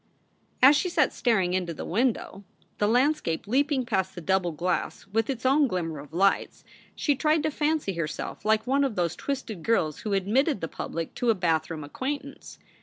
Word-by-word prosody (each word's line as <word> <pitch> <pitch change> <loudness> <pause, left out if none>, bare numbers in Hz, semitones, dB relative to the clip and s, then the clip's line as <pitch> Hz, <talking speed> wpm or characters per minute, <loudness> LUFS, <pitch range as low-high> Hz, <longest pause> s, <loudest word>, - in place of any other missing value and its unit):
As 275 +3 +9
she 360 - +1
sat 310 -5 +2
staring 195 -7 +1
into 180 -3 -1
the - - -6
window, 215 -2 -1 0.4
the 205 - +3
landscape 245 - +1
leaping 265 +3 +1
past 190 -5 -1
the - - -5
double 190 0 +1
glass 175 +4 -2
with 225 +4 -1
its 260 -3 -3
own 280 +2 +4
glimmer 165 - -3
of 145 +1 -11
lights, 195 +4 +1 0.3
she 290 - +1
tried 305 +2 +1
to 310 - 0
fancy 300 -8 0
herself 165 +2 -4
like 215 0 +2
one 275 +2 +2
of 265 -6 -1
those 175 -2 0
twisted 255 -9 -4
girls 160 -8 +1
who 210 - -3
admitted 225 - +1
the 165 - -3
public 165 +1 -5
to 245 -1 -1
a 225 - +4
bathroom 160 -3 -1
acquaintance. 275 - -6
215 Hz, 180 wpm, -27 LUFS, 175-275 Hz, 0.4 s, As